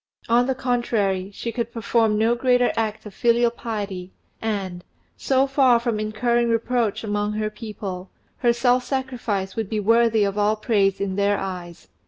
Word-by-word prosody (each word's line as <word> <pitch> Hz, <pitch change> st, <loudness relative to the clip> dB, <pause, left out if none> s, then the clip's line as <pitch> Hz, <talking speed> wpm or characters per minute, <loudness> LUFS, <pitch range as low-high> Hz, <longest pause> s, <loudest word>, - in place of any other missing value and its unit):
On 240 Hz, +2 st, +3 dB
the 265 Hz, -, 0 dB
contrary, 220 Hz, -7 st, 0 dB
she 230 Hz, +3 st, -5 dB
could 235 Hz, -1 st, -3 dB
perform 230 Hz, -2 st, +1 dB
no 225 Hz, +2 st, +3 dB
greater 245 Hz, 0 st, +2 dB
act 220 Hz, -1 st, -2 dB
of 210 Hz, -, -9 dB
filial 235 Hz, +1 st, +3 dB
piety, 200 Hz, -6 st, -5 dB, 0.3 s
and, 195 Hz, -5 st, -3 dB, 0.3 s
so 265 Hz, 0 st, +2 dB
far 265 Hz, -3 st, +4 dB
from 235 Hz, -3 st, -1 dB
incurring 235 Hz, +2 st, 0 dB
reproach 230 Hz, -1 st, 0 dB
among 205 Hz, 0 st, -1 dB
her 215 Hz, 0 st, -2 dB
people, 205 Hz, -4 st, -7 dB, 0.3 s
her 240 Hz, -2 st, +3 dB
self 245 Hz, +1 st, +2 dB
sacrifice 245 Hz, -7 st, -3 dB
would 220 Hz, -3 st, -3 dB
be 215 Hz, -, -1 dB
worthy 225 Hz, +1 st, +3 dB
of 200 Hz, +1 st, -1 dB
all 210 Hz, +1 st, +3 dB
praise 205 Hz, -3 st, +1 dB
in 195 Hz, -1 st, -2 dB
their 200 Hz, 0 st, +2 dB
eyes. 180 Hz, -3 st, -6 dB
220 Hz, 165 wpm, -23 LUFS, 200-240 Hz, 0.3 s, far